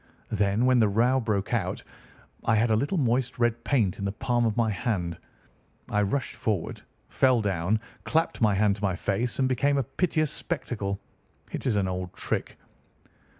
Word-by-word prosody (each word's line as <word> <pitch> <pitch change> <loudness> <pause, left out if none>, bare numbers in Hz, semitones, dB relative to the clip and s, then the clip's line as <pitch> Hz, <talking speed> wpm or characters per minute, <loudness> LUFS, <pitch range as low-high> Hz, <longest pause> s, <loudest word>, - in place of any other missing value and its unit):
"Then, 105 +2 +2
when 130 -1 +5
the 110 - +5
row 120 +6 +3
broke 105 -3 -1
out, 95 -6 -1 0.6
I 115 - +3
had 110 +1 +3
a - - +5
little 145 - 0
moist 125 -2 +1
red 120 -1 +1
paint 110 -10 +1
in 100 - -3
the 100 - 0
palm 120 +2 +1
of 110 - -2
my 115 -2 +2
hand. 95 -6 -2 0.7
I 105 - +2
rushed 120 +6 -1
forward, 100 -7 -2 0.3
fell 130 -2 +3
down, 100 0 0 0.2
clapped 160 -4 0
my 105 -3 +4
hand 100 0 +2
to 105 - -10
my 95 -3 +1
face, 105 +6 -1
and 130 - +2
became 140 +3 +2
a 135 - +2
piteous 155 +1 0
spectacle. 105 - -3 0.5
It - - -3
is 115 - +2
an 100 -2 +1
old 90 -1 -4
trick." - - -3
110 Hz, 180 wpm, -27 LUFS, 100-125 Hz, 0.7 s, when